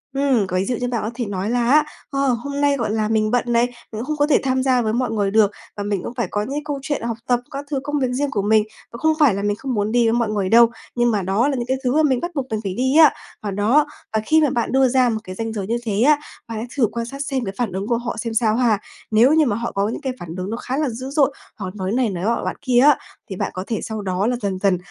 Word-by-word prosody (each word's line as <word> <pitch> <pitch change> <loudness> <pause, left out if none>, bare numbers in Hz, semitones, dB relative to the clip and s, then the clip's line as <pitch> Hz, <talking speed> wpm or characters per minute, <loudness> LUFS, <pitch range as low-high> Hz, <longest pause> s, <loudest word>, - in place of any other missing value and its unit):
Ừm, 265 -8 +2
có 185 - -1
ví 190 - 0
dụ 250 - -1
như 245 +1 -2
bạn 240 -2 -1
có 215 - -3
thể 245 -1 -2
nói 200 0 -3
là 240 -1 +1
á: 305 +1 +6 0.3
"Ờ, 275 -1 0
hôm 280 +3 -1
nay, 285 -1 +3
gọi 230 -4 -1
là, 215 -1 0
mình 215 0 +1
bận 245 - +2
này, 235 0 +3
mình 245 - -8 0.2
cũng 220 +1 -4
không 305 +2 -3
có 290 0 +3
thể 295 - +4
tham 260 -1 +1
gia 255 -2 +3
với 220 -1 -1
mọi 245 -2 0
người 205 -3 0
được, 215 -2 +4 0.3
và 205 - -3
mình 200 -3 -2
cũng - - -5
phải 235 -5 -2
có 205 - 0
những 215 - -5
cái 295 +1 -2
câu 290 -2 -3
chuyện 290 +1 -2
học 230 -1 -2
tập, 245 -1 +3
các 280 +1 -5
thứ 275 - 0
công 290 0 -1
việc 260 - +1
riêng 280 +3 -1
của 205 - 0
mình. 215 +1 +3 0.3
Và 235 - -8
không 315 +4 +2
phải 280 -9 +5
là 200 - -2
mình 205 0 +1
không 260 +3 -4
muốn 210 0 0
đi 240 0 +3
với 225 - +2
mọi 235 -2 +1
người 200 -3 -1
đâu, 235 0 +7 0.3
nhưng 240 -1 +2
mà 205 -2 0
đó 195 +8 +1
là 285 - 0
những 240 -2 -2
cái 260 +1 0
thứ 250 +1 +1
mà 315 - +4
mình 260 -5 +2
bắt 345 +1 -3
buộc 270 -2 -1
mình 220 -1 -1
phải 195 -2 -3
đi 260 +5 +1
á." 315 -3 +8 0.3
Và 205 - -3
đó, 225 +10 +3 0.3
và 220 - +2
khi 315 +5 +4
mà 295 - +3
bạn 235 - -1
đưa 265 0 +4
ra 250 -1 +3
một 220 -1 -1
cái 185 0 -8
ranh 225 +1 -4
giới 200 -3 -4
như 235 +2 0
thế 210 -2 -1
á, 295 +3 +5 0.3
bạn 225 -1 -5
hãy 230 - -4
thử 235 -5 +4
quan 235 +1 -3
sát 275 +4 -7
xem 270 -4 -2
cái 195 - -4
phản 235 -6 -1
ứng 195 +3 -4
của 235 -1 +1
họ 235 -1 -4
xem 230 0 -3
sao 220 -1 +2
ha. 230 -4 +2 0.3
Nếu 240 +7 +5
như 315 -2 +4
mà 210 - 0
họ 235 +2 -3
có 200 +1 0
những - - -5
cái 265 -2 -2
phản 170 0 -7
ứng 185 +2 -4
nó 230 - -3
khá 255 +2 -3
là 300 -2 +1
dữ 255 +3 -6
dội 280 -1 +2 0.2
hoặc 190 -2 -6
nói 190 -1 -3
này 245 -1 +1
nói 180 -1 -4
nọ 235 +2 0
bạn - - -2
kia 250 -3 +3
á, 285 +2 +6 0.3
thì 190 - -4
bạn - - -2
có 185 - -4
thể 225 - -2
sau 220 -1 -4
đó 190 +1 -1
là 245 - +1
dần 190 -2 -2
dần 195 -2 +2
235 Hz, 325 wpm, -21 LUFS, 210-265 Hz, 0.3 s, á